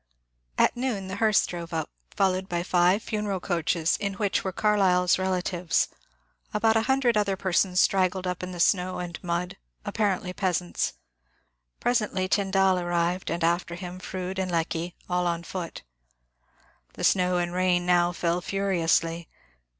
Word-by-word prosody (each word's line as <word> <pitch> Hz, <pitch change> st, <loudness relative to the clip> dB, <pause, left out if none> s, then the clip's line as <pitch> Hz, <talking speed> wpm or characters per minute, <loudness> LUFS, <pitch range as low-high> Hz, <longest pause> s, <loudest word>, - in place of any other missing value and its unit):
At -, -, +3 dB
noon 235 Hz, -7 st, -2 dB
the 190 Hz, -, -4 dB
hearse 215 Hz, -1 st, +3 dB
drove 170 Hz, -1 st, -6 dB
up, 160 Hz, -1 st, -3 dB, 0.2 s
followed 190 Hz, -1 st, +1 dB
by 175 Hz, -1 st, -1 dB
five 180 Hz, +4 st, +3 dB
funeral 210 Hz, -3 st, -2 dB
coaches 170 Hz, -2 st, 0 dB
in 200 Hz, -1 st, -3 dB
which 205 Hz, -1 st, 0 dB
were 190 Hz, -, -2 dB
Carlyle's 185 Hz, -3 st, +3 dB
relatives; 180 Hz, -2 st, 0 dB, 0.7 s
about 220 Hz, +1 st, +3 dB
a 225 Hz, -, +4 dB
himdred 255 Hz, -1 st, +2 dB
other 200 Hz, -2 st, +1 dB
per 190 Hz, -1 st, -3 dB
sons 180 Hz, +2 st, +3 dB
straggled 185 Hz, -1 st, +2 dB
up 180 Hz, -1 st, -3 dB
in 180 Hz, 0 st, -5 dB
the 175 Hz, -, -7 dB
snow 185 Hz, +1 st, +2 dB
and 175 Hz, 0 st, -6 dB
mud, 175 Hz, 0 st, -2 dB, 0.3 s
apparently 190 Hz, -3 st, -1 dB
peasants; 180 Hz, -2 st, -1 dB, 0.9 s
presently 210 Hz, -6 st, 0 dB
Tyndall 190 Hz, -1 st, +2 dB
arrived, 175 Hz, +1 st, -1 dB
and 170 Hz, +1 st, -2 dB
after 170 Hz, +1 st, 0 dB
him 180 Hz, +1 st, -7 dB
Froude 185 Hz, 0 st, -5 dB
and 185 Hz, -1 st, -1 dB
Lecky, 170 Hz, 0 st, -2 dB
all 180 Hz, -1 st, 0 dB
on 170 Hz, 0 st, -1 dB
foot. 175 Hz, -1 st, -6 dB, 1.1 s
The -, -, -7 dB
snow 180 Hz, -1 st, +3 dB
and 175 Hz, 0 st, -1 dB
rain 180 Hz, -1 st, +2 dB
now 175 Hz, -1 st, +3 dB
fell 175 Hz, 0 st, -1 dB
furiously. 170 Hz, -4 st, 0 dB
180 Hz, 150 wpm, -26 LUFS, 175-195 Hz, 1.1 s, a